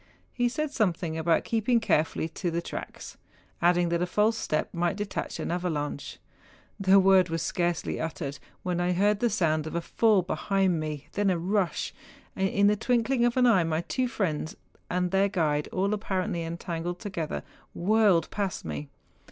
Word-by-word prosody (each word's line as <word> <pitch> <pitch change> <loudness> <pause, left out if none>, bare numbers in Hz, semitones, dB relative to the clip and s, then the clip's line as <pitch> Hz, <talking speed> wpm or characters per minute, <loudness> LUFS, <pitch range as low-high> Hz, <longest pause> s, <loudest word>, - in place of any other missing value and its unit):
He 245 -1 +1
said 305 +3 -2
something 175 - 0
about 160 +1 +2
keeping 230 +1 +2
carefully 160 -6 +1
to 175 - -3
the 170 0 -1
tracks, 170 - -7 0.4
adding 175 0 +3
that 170 0 0
a 180 - +1
false 210 +5 +2
step 155 -8 -2
might 175 +1 0
detach 205 -1 -4
an - - -3
avalanche. 155 -5 -3 0.6
The 195 0 +6
word 190 -2 +5
was 165 0 -2
scarcely 175 +1 -1
uttered 145 -3 -4 0.2
when 175 -1 -1
I 180 0 +1
heard 205 +3 +2
the 240 - +2
sound 160 -7 +1
of 155 - -6
a - - +2
fall 210 +1 +3
behind 190 -1 0
me, 150 -2 -4
then 205 -1 +1
a 180 - +2
rush, 185 +1 -1 0.4
and 190 0 +1
in 200 +1 +2
the 205 +1 +5
twinkling 240 +3 +1
of 240 +1 +1
an 250 - +5
eye 220 -8 +5
my 160 0 0
two 255 +8 -1
friends 170 - -2 0.3
and 180 0 0
their 195 +1 +3
guide—all 175 +3 0
apparently 190 -3 -2
entangled 170 +1 -4
together, 180 -6 -4 0.3
whirled 195 -3 +3
past 200 -4 -3
me. 75 -2 -5
180 Hz, 170 wpm, -27 LUFS, 165-205 Hz, 0.6 s, The